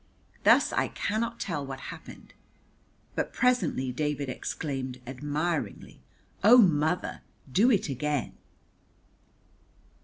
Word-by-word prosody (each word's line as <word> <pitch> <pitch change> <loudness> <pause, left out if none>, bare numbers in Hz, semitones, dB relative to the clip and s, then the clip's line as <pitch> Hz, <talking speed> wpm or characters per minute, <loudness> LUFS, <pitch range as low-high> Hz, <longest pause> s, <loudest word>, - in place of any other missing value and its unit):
Thus - - +5
I - - +1
cannot 230 +2 -2
tell 165 -7 -2
what 135 -1 -6
happened, - - -13 0.8
but - - -2
presently 185 - +1
David 145 0 -2
exclaimed 130 -1 -4
admiringly, 145 0 -3 0.4
"Oh, 230 +5 +9
mother, 165 -5 +2 0.3
do 215 - +4
it 210 -7 +2
again!" 145 0 -2
150 Hz, 95 wpm, -28 LUFS, 135-195 Hz, 0.8 s, Oh